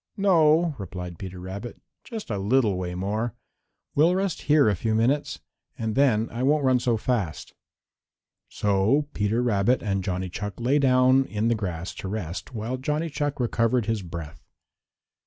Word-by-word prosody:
"No," 170 -4 +4
replied 90 -3 -7
Peter 95 -1 -7
Rabbit, 95 +6 -7 0.2
"just 225 - -7
a 100 - -1
little 105 0 +2
way 90 -1 -4
more. 105 +5 -2 0.6
We'll 165 +5 +4
rest 190 -3 -1
here 150 -4 +6
a 105 - +3
few 110 +5 -1
minutes 130 +6 0 0.4
and 110 -1 -2
then 115 -5 +3
I 115 - -4
won't 145 +3 +2
run 130 -1 +4
so 120 -2 +1
fast." 105 - -2 1.0
So 105 +9 +1
Peter 105 +4 0
Rabbit 120 +1 +2
and 100 -3 -1
Johnny 90 0 -2
Chuck 105 +4 -6
lay 130 +5 +2
down 130 0 +4
in 110 0 -1
the - - +3
grass 90 -4 -4
to - - -5
rest 90 -5 -5
while 115 +4 -3
Johnny 150 +5 -2
Chuck 145 -1 -2
recovered 120 -1 +1
his 110 -2 -1
breath. 85 -4 -8
115 Hz, 160 wpm, -25 LUFS, 100-135 Hz, 1.0 s, here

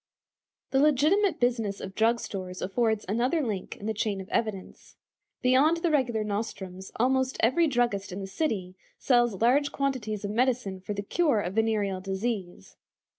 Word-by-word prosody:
The 270 - +3
legitimate 305 +8 +3
business 230 -5 0
of 190 - -7
drug 230 +3 +2
stores 185 -4 -6
affords 220 +2 0
another 240 - +1
link 205 -5 -4
in 205 - -9
the 220 - 0
chain 210 -2 -1
of 190 +1 -8
evidence. 215 -5 -3 0.5
Beyond 270 +6 +4
the 335 0 0
regular 240 -7 +1
nostrums, 195 -3 -5
almost 260 +2 +1
every 320 +9 +4
druggist 240 -8 0
in 185 - -5
the 195 - -4
city 195 - -2 0.2
sells 240 -4 +2
large 285 +5 +3
quantities 230 -7 -2
of 205 - -3
medicine 235 -5 0
for 205 +2 -5
the 200 - -3
cure 290 +1 +2
of 180 -1 -4
venereal 210 -3 0
disease. 190 - -4
225 Hz, 160 wpm, -27 LUFS, 195-255 Hz, 0.5 s, Beyond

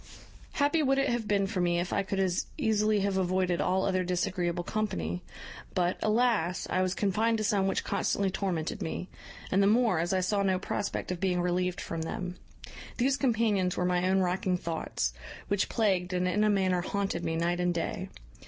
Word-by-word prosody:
"Happy 290 +2 +2
would 270 -2 +2
it 275 0 +2
have 235 -3 -1
been 200 -1 +2
for 195 -2 -2
me 175 -1 +2
if 175 +1 -2
I - - +2
could 195 0 -3
as 185 -2 0
easily 215 -5 +2
have 195 -1 0
avoided 185 -1 +1
all 190 +1 +1
other 185 -1 +1
disagreeable 175 -1 -1
company; 90 - -2 0.5
but, 180 0 +1
alas! 215 -6 +1
I 185 - +2
was 185 0 0
confined 220 +3 +1
to 215 - -2
some 200 -2 +2
which 195 - 0
constantly 195 -1 0
tormented 185 -1 -2
me; 180 +1 -4 0.4
and 195 - +3
the 200 - +4
more, 220 -5 +3
as 170 +1 0
I 190 -1 +2
saw 200 +2 +1
no 190 -1 +2
prospect 190 0 -3
of 180 - -3
being 185 -1 +1
relieved 180 0 0
from 165 -1 -4
them. 180 +2 -4 0.6
These 260 +2 +2
companions 220 -8 +1
were 180 - +1
my 180 0 +1
own 190 0 +3
racking 180 0 0
thoughts, 160 - -2 0.4
which 200 -1 +1
plagued 190 -5 +1
and 180 0 +1
in 205 +3 +2
a 215 - +4
manner 190 -3 +2
haunted 195 -2 -2
me 165 -1 -1
night 170 +2 0
and 180 0 +2
day. 170 -1 -3
185 Hz, 195 wpm, -29 LUFS, 180-210 Hz, 0.6 s, the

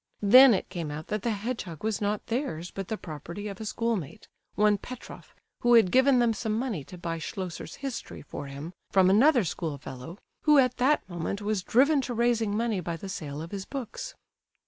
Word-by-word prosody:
Then 250 +3 +9
it - - -3
came 170 -4 -4
out 150 +2 -6
that 210 -1 -1
the 235 - -1
hedgehog 210 - -4
was 215 -2 -1
not 205 0 -1
theirs, 225 - -3
but 195 -2 -5
the 220 - -3
property 170 +5 -7
of 200 0 -7
a - - -5
schoolmate, 210 - -3 0.3
one 210 -1 +3
Petroff, 255 +3 -10 0.2
who 240 0 +5
had 220 -6 +5
given 260 0 +5
them 240 -2 +3
some 220 -1 -2
money 225 - -2
to 180 - -11
buy 165 -1 -4
Schlosser's 180 +1 -6
History 275 -3 -6
for 145 0 -7
him, 140 +5 -7 0.2
from 190 -1 +4
another 250 +4 +5
schoolfellow 150 -2 -5 0.2
who 300 -1 +5
at 255 -2 +3
that 265 0 +2
moment 175 +2 -3
was 210 -2 0
driven 275 - +3
to 250 -2 -4
raising 230 -3 +1
money 225 -3 0
by 170 -1 -4
the 195 +4 -8
sale 150 -5 -5
of 165 - -9
his 195 -2 -5
books. 280 - -6
205 Hz, 195 wpm, -28 LUFS, 170-240 Hz, 0.3 s, Then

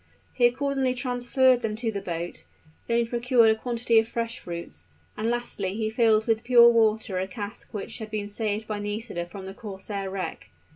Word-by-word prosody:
He 240 -2 +5
accordingly 265 0 0
transferred 250 0 +2
them 220 -2 -2
to 225 0 -2
the 200 -2 -4
boat; 170 -2 -5 0.4
then 235 - +2
he 235 - +2
procured 235 -1 +4
a - - +2
quantity 235 0 +2
of 220 - 0
fresh 230 +1 -3
fruits; 170 -1 -8 0.3
and 220 +2 -1
lastly 220 -5 -2
he 220 0 -1
filled 220 -1 +3
with 225 -1 +1
pure 235 -1 +7
water 220 -4 +2
a 190 - -2
cask 205 +2 -7
which 210 -4 -5
had 220 -1 -6
been 210 -1 -3
saved 215 +1 -2
by 210 -1 -3
Nisida 205 -4 -4
from 190 +1 -9
the 190 - -7
corsair 195 -1 -5
wreck. 190 -1 -5
220 Hz, 190 wpm, -26 LUFS, 205-240 Hz, 0.4 s, pure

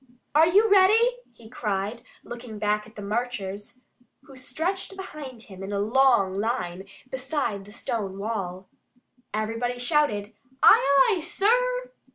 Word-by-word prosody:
"Are 315 +2 +6
you 405 +6 +5
ready?" 435 +5 +5
he 225 - -16
cried, 215 -1 -3 0.2
looking 240 -2 -8
back 210 0 0
at 220 - -18
the 205 - -8
marchers, 210 -1 -4 0.5
who 270 - -15
stretched 360 +10 -3
behind 285 -10 -8
him 190 -4 -12
in 195 +1 -6
a 200 - -1
long 225 -3 +3
line 195 -3 -2 0.3
beside 265 -6 -2
the 205 - -13
stone 205 -3 -4
wall. 195 -3 -4 0.6
Everybody 230 +3 -2
shouted 245 -6 0 0.3
"Aye, 275 +5 +6
aye, - - -3
sir!" - - +1
240 Hz, 135 wpm, -25 LUFS, 205-305 Hz, 0.6 s, Are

